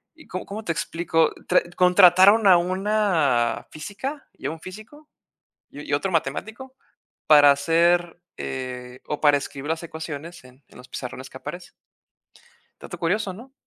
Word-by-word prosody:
y 310 - -18
¿có-cómo 200 +4 -6
te 170 - -2
explico? 165 -1 0 0.2
Tra 180 - +4
contrataron 185 +3 +6
a 185 -2 +8
una 180 - 0
física 210 - -7
y - - -14
a - - -2
un 160 - -9
físico 215 - -12 0.6
y 145 - -10
y - - -1
otro 185 +6 0
matemático 220 - -3 0.5
para 145 -2 +8
hacer, 170 +4 +1 0.2
eh, 125 -1 -6
o 150 - -3
para 145 -1 +5
escribir 140 +1 -7
las 160 +1 -2
ecuaciones 160 -1 -8
en 130 +2 -19
en - - -18
los 125 - -14
pizarrones 130 +1 -7
que 130 - -10
aparecen. 175 +5 -9 1.1
Dato - - -9
curioso, 190 +3 -1
¿no? 250 +7 -13
170 Hz, 150 wpm, -23 LUFS, 145-195 Hz, 1.1 s, a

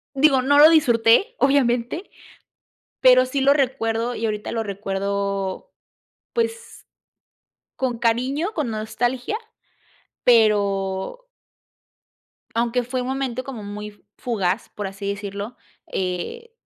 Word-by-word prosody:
digo, 275 -1 +4
no 285 +3 +3
lo 305 +2 +10
disfruté 270 - +4
obviamente, 270 - +1 0.9
pero 255 0 +6
sí 270 +2 -2
lo 275 +1 +5
recuerdo. 245 -4 0
y 230 - -4
ahorita 210 -1 -3
lo 225 -1 -1
recuerdo, 200 - -3 0.6
pues, 465 0 -3 0.9
con 250 -3 -2
cariño, 255 - 0
con 295 -7 -1
nostalgia, 240 - -2 0.9
pero 205 - +2 1.3
aunque 235 +1 +1
fue 250 +1 -3
un 250 - -4
momento 260 -1 -2
como 250 -6 -7
muy 205 0 -8 0.2
fugaz, 200 -4 -1
por 205 -2 -5
así 195 +1 -7
decirlo, 200 +3 -5 0.3
eh, 190 - -4
235 Hz, 110 wpm, -22 LUFS, 205-270 Hz, 1.3 s, lo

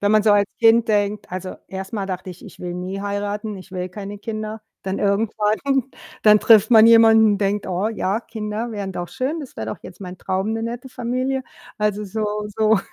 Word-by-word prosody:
Wenn 205 - +2
man 215 - +5
so 210 -1 +5
als 205 -1 +4
Kind 230 0 +5
denkt 205 -1 0
also, 185 0 -5
erst 190 +1 -6
mal 200 -3 -2
dachte 185 0 -5
ich: 180 - -12
„Ich - - -13
will 175 -1 -5
nie 185 +2 -5
heiraten, 205 +1 -3
ich 185 +1 -12
will 180 -1 -4
keine 205 +1 -7
Kinder.“ 215 0 -5 0.2
Dann 190 0 -3
irgendwann 210 +1 +1 0.6
dann 210 -1 +6
trifft 220 0 +6
man 220 -1 +8
jemanden, 225 -2 +6
denkt: 200 0 -1
„Oh 185 +3 -1
ja, 215 -1 -1
Kinder 220 +1 -5
wären 200 -3 -4
doch 175 0 -5
schön. 275 +6 -2
Das 275 - -10
wäre 110 - -4
doch 110 - -5
jetzt 180 - -12
mein 185 -1 -7
Traum, 190 +4 -2
'ne 225 0 -2
nette 240 +3 -5
Familie.“ 255 +2 -2 0.3
Also, 210 -1 0
so 210 +1 -3
so 215 -1 +4
210 Hz, 205 wpm, -21 LUFS, 195-220 Hz, 0.6 s, man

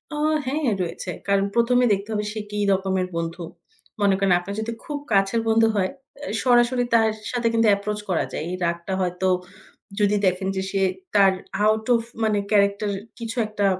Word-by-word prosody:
ও! - - -4 0.3
হ্যাঁ 290 +3 -1 0.2
রয়েছে। 175 +1 -4 0.5
কারণ 235 +1 +3
এ - - +5
দেখতে 200 +2 -3
হবে 210 0 -1
সে 220 - -4
কি 210 - -3
রকমের 190 -1 0
বন্ধু। 170 +1 -3 0.6
মনে 200 -1 +4
করেন 195 -2 +3
আপনার 200 +3 -6
যদি 230 +1 -3
খুব 295 - -3
কাছের 195 +3 +2
বন্ধু 225 0 +4
হয়, 190 -2 +1 0.3
অ্যা 290 - -6
সরাসরি 245 0 +4
তার 225 -1 +5 0.2
সাথে 245 -2 0
কিন্তু 225 -1 +3
এপ্রোচ 210 +1 -4
করা 175 - +1
যায়। - - -4
এই 180 - -3
রাগটা 170 +2 -2
হয়তো 180 +1 -1 0.7
যদি 205 0 +3
দেখেন 185 +1 +1
যে 190 - -1
সে 195 -1 0 0.3
তার 195 -1 +6 0.3
আউট 220 0 +2
ওফ 230 - +2 0.2
মানে 215 -1 +2
ক্যারাক্টার 200 0 +2 0.3
কিছু 230 +1 -5
একটা 210 -1 -1
205 Hz, 180 wpm, -23 LUFS, 190-225 Hz, 0.7 s, তার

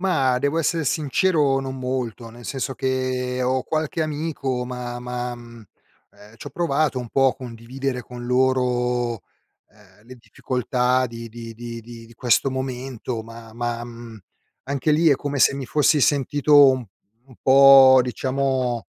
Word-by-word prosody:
Ma, 135 -9 +1
devo 140 +5 0
essere 165 0 0
sincero: 150 0 +1
non 135 0 -6
molto. 125 -3 -4
Nel 120 +1 -14
senso 135 +1 -4
che 130 -1 -2
ho 130 0 0
qualche 160 +2 -2
amico, 145 -5 -3
ma 125 -1 -6
ma, 125 0 -4
mhmm, 120 -2 -13 0.5
ehm, 105 +2 -17
c'ho - - -9
provato 155 -5 0
un 120 - -8
po' 135 +2 +2
condividere 125 +2 -5
con 120 0 -10
loro, 125 -2 0 0.5
ehm, 105 -1 -23
le 130 - -11
difficoltà 125 +2 -1
di 115 0 -8
di 115 0 -9
di 115 0 -8
di 115 0 -12
di 115 - -18
questo 125 +3 +2
momento, 130 -3 -5
ma 115 0 -12
ma, 120 0 -3
mhmm, 115 -2 -11 0.5
anche 140 +3 -1
lì 160 +2 +4
è 140 - +4
come 145 +1 -4
se - - +5
mi 135 -2 -5
fossi 150 +3 +2
sentito 145 +1 +4
un 130 -3 -3 0.4
un 130 - -16
po' 135 -1 +8
diciamo 130 -1 -2
125 Hz, 150 wpm, -22 LUFS, 120-135 Hz, 0.5 s, po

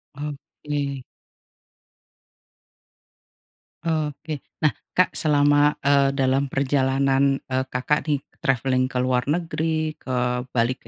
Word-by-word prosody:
Oke. 145 -1 -5 2.8
Oke. 155 -2 -2 0.2
Nah, 150 - +4 0.2
Kak 185 - +4
selama, 145 -1 +3
eee, 140 -1 +4
dalam 135 +1 +2
perjalanan, 135 0 +2
eee, 130 0 -2
Kakak 140 +5 -1
nih 145 - +3 0.2
travelling 130 0 +1
ke 130 - -4
luar 125 0 +1
negeri, 160 -1 -1
ke 125 -1 -1
balik 125 +1 -1
140 Hz, 95 wpm, -23 LUFS, 130-150 Hz, 2.8 s, Nah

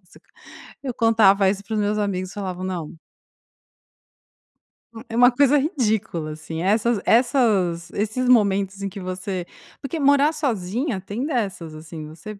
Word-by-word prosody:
Nossa, - - -21 0.6
eu 255 -3 -4
contava 210 -4 +4
isso 200 0 -4
para 220 - -9
os 215 - +1
meus 210 +1 0
amigos, 185 -2 -2
falavam: 185 -2 -5
"Não" 175 -5 -5 2.0
hu 225 +1 -10
é 225 - -7
uma 245 +1 +6
coisa 280 +3 +4
ridícula, 220 - -1
assim, 160 +1 -6
essas 215 +4 +2
essas 220 - +2
esses 220 +5 -2
momentos 200 -4 +2
em 200 - -2
que 195 - -9
você 185 0 -4 0.4
Porque 280 +3 -4
morar 285 +2 +4
sozinha 240 - -2
tem 205 +7 -5
dessas, 195 - -3
assim, 155 0 -9
você 170 +7 -10
205 Hz, 145 wpm, -22 LUFS, 185-245 Hz, 2.0 s, uma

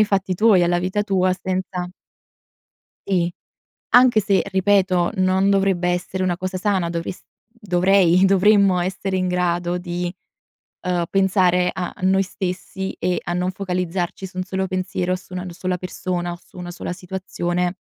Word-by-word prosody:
ai 215 - +7
fatti 190 -2 0
tuoi 205 -2 +5
alla 175 0 +2
vita 185 +4 -1
tua 185 -3 +1
senza 185 -1 -3 1.2
Sì 175 -3 +1 0.6
anche 245 -2 +6
se 200 -1 +2
ripeto, 190 -2 +2
non 190 +1 +2
dovrebbe 195 -3 +2
essere 180 +1 -2
una 180 -2 0
cosa 185 0 -3
sana, 185 -4 0
dovres 170 +1 -5 0.3
dovrei, 190 -4 +3
dovremmo 195 -1 +4
essere 190 +1 -2
in 185 - 0
grado 180 0 0
di, 175 0 -3 0.7
uhm, 175 -2 0
pensare 185 -2 +3
a 180 -1 -4
noi 190 +1 +3
stessi 190 0 -4
e 180 +1 0
a - - -4
non 180 +1 0
focalizzarci 180 -1 -3
su 185 - -19
un 185 - -2
solo 190 0 -2
pensiero, 185 -1 -1
su 185 0 -13
una 180 0 -4
sola 180 +1 -3
persona 180 -1 -3
o 175 - -9
su 180 - -20
una 175 -1 -6
sola 175 - -6
situazione, 180 -1 -3
185 Hz, 155 wpm, -21 LUFS, 180-190 Hz, 1.2 s, ai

